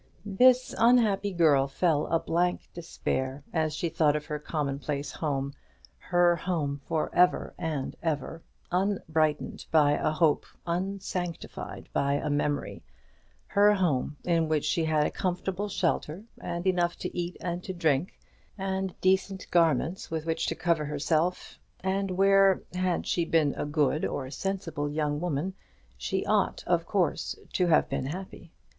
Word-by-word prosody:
This 250 Hz, +5 st, +4 dB
unhappy 220 Hz, -4 st, +4 dB
girl 155 Hz, -6 st, +4 dB
felt 150 Hz, +1 st, +1 dB
a 165 Hz, -, +3 dB
blank 175 Hz, +2 st, -1 dB
despair 135 Hz, -5 st, -3 dB
as 155 Hz, -2 st, 0 dB
she 170 Hz, -, -1 dB
thought 155 Hz, -3 st, +2 dB
of 150 Hz, -, -3 dB
her 150 Hz, 0 st, -4 dB
commonplace 145 Hz, -2 st, -3 dB
home, 140 Hz, -3 st, -2 dB, 0.5 s
her 175 Hz, -1 st, +3 dB
home 150 Hz, -5 st, -2 dB
for 160 Hz, -2 st, -1 dB
ever 180 Hz, 0 st, +3 dB
and 155 Hz, -5 st, -3 dB
ever, 160 Hz, 0 st, -2 dB, 0.3 s
unbrightened 160 Hz, -5 st, 0 dB
by 150 Hz, -2 st, +5 dB
a 145 Hz, -, +1 dB
hope, 155 Hz, -1 st, +2 dB, 0.2 s
unsanctified 180 Hz, -1 st, -4 dB
by 140 Hz, 0 st, +1 dB
a 145 Hz, -, -1 dB
memory; 145 Hz, 0 st, -1 dB, 0.6 s
her 205 Hz, 0 st, +4 dB
home, 150 Hz, -6 st, 0 dB
in 165 Hz, -2 st, +1 dB
which 155 Hz, -2 st, +1 dB
she 160 Hz, +2 st, +1 dB
had 155 Hz, -1 st, +2 dB
a -, -, -1 dB
comfortable 190 Hz, +2 st, -2 dB
shelter, 175 Hz, -1 st, -1 dB, 0.2 s
and 170 Hz, +1 st, -4 dB
enough 175 Hz, -2 st, +2 dB
to -, -, -6 dB
eat 175 Hz, 0 st, -3 dB
and 175 Hz, 0 st, -4 dB
to 190 Hz, -, -4 dB
drink, 165 Hz, -2 st, 0 dB, 0.4 s
and 190 Hz, -1 st, -3 dB
decent 190 Hz, 0 st, +1 dB
garments 165 Hz, 0 st, +2 dB
with 160 Hz, -1 st, -3 dB
which 160 Hz, -1 st, -1 dB
to -, -, -1 dB
cover 165 Hz, -3 st, +1 dB
herself; 155 Hz, +4 st, -1 dB, 0.2 s
and 195 Hz, +1 st, -1 dB
where, 195 Hz, +1 st, +4 dB
had 180 Hz, -1 st, 0 dB
she 175 Hz, -, +1 dB
been 160 Hz, -3 st, +2 dB
a -, -, -3 dB
good 150 Hz, 0 st, +1 dB
or 135 Hz, -, -2 dB
a 130 Hz, -, -9 dB
sensible 165 Hz, -5 st, -3 dB
young 150 Hz, 0 st, -1 dB
woman, 175 Hz, +2 st, -1 dB, 0.4 s
she 60 Hz, +1 st, -2 dB
ought -, -, +1 dB
of -, -, +1 dB
course -, -, 0 dB, 0.2 s
to 180 Hz, -, +2 dB
have 160 Hz, -, +4 dB
been 130 Hz, -, -2 dB
happy. 175 Hz, +1 st, -7 dB
165 Hz, 150 wpm, -28 LUFS, 150-185 Hz, 0.6 s, by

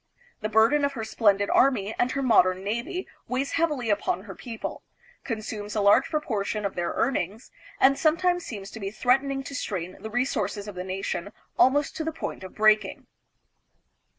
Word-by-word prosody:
The 215 Hz, -, -3 dB
burden 225 Hz, +7 st, +4 dB
of 280 Hz, 0 st, +1 dB
her 230 Hz, -4 st, -4 dB
splendid 205 Hz, -2 st, +2 dB
army 225 Hz, -6 st, +3 dB
and 245 Hz, -, +3 dB
her 275 Hz, -, -1 dB
modern 185 Hz, -6 st, +4 dB
navy 235 Hz, -, -3 dB, 0.2 s
weighs 260 Hz, +2 st, -1 dB
heavily 295 Hz, -9 st, 0 dB
upon 195 Hz, -2 st, 0 dB
her 200 Hz, -3 st, -8 dB
people, 230 Hz, +2 st, -6 dB, 0.4 s
consumes 215 Hz, -2 st, -5 dB
a 210 Hz, -, +1 dB
large 200 Hz, 0 st, +5 dB
proportion 215 Hz, -8 st, -2 dB
of 200 Hz, -, -1 dB
their 175 Hz, -1 st, -2 dB
earnings, 220 Hz, -3 st, -1 dB, 0.3 s
and 275 Hz, +1 st, +5 dB
sometimes 350 Hz, +3 st, +2 dB
seems 200 Hz, -7 st, -7 dB
to 225 Hz, -, -8 dB
be 195 Hz, -2 st, -3 dB
threatening 270 Hz, +5 st, +1 dB
to 280 Hz, -, -8 dB
strain 185 Hz, -8 st, -4 dB
the 220 Hz, -, -6 dB
resources 215 Hz, -4 st, -1 dB
of 205 Hz, -, -6 dB
the 180 Hz, 0 st, -5 dB
nation 190 Hz, 0 st, -4 dB, 0.2 s
almost 280 Hz, +3 st, +3 dB
to 320 Hz, -, -2 dB
the 320 Hz, -, -2 dB
point 320 Hz, -, -6 dB
of 185 Hz, -, -10 dB
breaking. 215 Hz, -2 st, +3 dB
220 Hz, 175 wpm, -26 LUFS, 200-270 Hz, 0.4 s, large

